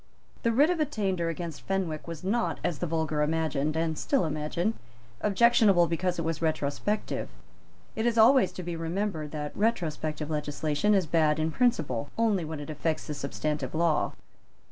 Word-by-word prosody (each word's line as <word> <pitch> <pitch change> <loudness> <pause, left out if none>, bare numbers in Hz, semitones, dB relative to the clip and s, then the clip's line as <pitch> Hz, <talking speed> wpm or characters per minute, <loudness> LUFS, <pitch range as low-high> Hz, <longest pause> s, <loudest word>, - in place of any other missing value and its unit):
The 230 - +2
writ 285 +9 +4
of 350 - -1
attainder 195 - 0
against 165 -1 -5
Fenwick 180 -6 -2
was 165 -1 -7
not, 230 +5 0
as 160 - -1
the 175 - -1
vulgar 160 -2 -1
imagined 155 -1 0
and 160 -1 0
still 270 - +1
imagine, 155 +7 -1 0.5
objectionable 210 -3 +5
because 175 +2 -1
it 165 - -2
was 165 -1 -2
retrospective. 155 +6 -1 0.7
It 220 +2 0
is 235 -1 +1
always 235 -1 +6
to 180 - -6
be 175 0 -4
remembered 165 -1 -2
that 150 -1 -5
retrospective 155 -8 -1
legislation 150 +6 0
is 190 -3 +2
bad 155 -1 +2
in 160 +1 0
principle 155 - 0
only 215 -6 +2
when 155 -1 -5
it 145 +1 -6
affects 155 +1 -2
the 150 - -4
substantive 145 -1 -3
law. 165 -1 +1
165 Hz, 165 wpm, -28 LUFS, 155-200 Hz, 0.7 s, always